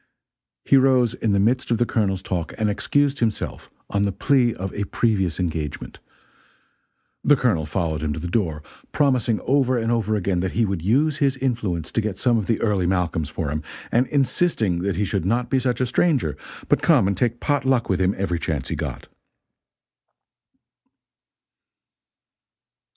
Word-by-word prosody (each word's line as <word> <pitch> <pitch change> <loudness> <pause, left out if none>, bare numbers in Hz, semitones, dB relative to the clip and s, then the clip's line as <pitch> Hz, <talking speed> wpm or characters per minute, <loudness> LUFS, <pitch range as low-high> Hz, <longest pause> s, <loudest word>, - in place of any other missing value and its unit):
He 135 - +5
rose 130 -3 +3
in 115 -3 -1
the 100 - +2
midst 120 +6 +1
of 115 - +2
the 120 - +2
Colonel's 95 -5 -1
talk 85 -4 -3
and 105 -1 +1
excused 140 +6 0
himself 110 -3 -2 0.2
on 100 - -1
the 100 0 +1
plea 120 +3 +2
of 95 +1 -5
a 100 - -2
previous 95 -7 0
engagement. 80 -4 -4 1.2
The 145 - +5
Colonel 100 - 0
followed 80 -2 -2
him 80 -1 -1
to 80 - -5
the 90 - -5
door, 85 -6 -1 0.3
promising 125 -6 +2
over 130 -1 +2
and 115 0 0
over 110 -2 0
again 95 -3 0
that 95 +1 -2
he 115 - +2
would 95 -4 -2
use 140 - +2
his 135 -2 +1
influence 110 - -2
to 115 - 0
get 105 -3 -3
some 120 -1 +2
of 105 - -4
the 115 - +1
Early 100 -5 +1
Malcolms 90 -4 -1
for 75 -4 -3
him, 75 +1 -2 0.3
and 125 +2 +2
insisting 135 - +1
that 95 +1 -1
he 105 +3 0
should 85 - -2
not 120 +7 0
be 135 - +3
such 125 -2 -1
a 130 - +2
stranger 125 - +1 0.3
but - - +2
come - - +4
and 100 - 0
take 120 +4 0
pot 145 -1 0
luck 130 -3 +1
with 95 -1 0
him 95 +2 +2
every 90 -3 -1
chance 75 -6 -3
he - - -2
got. - - -5
105 Hz, 180 wpm, -22 LUFS, 90-125 Hz, 1.2 s, He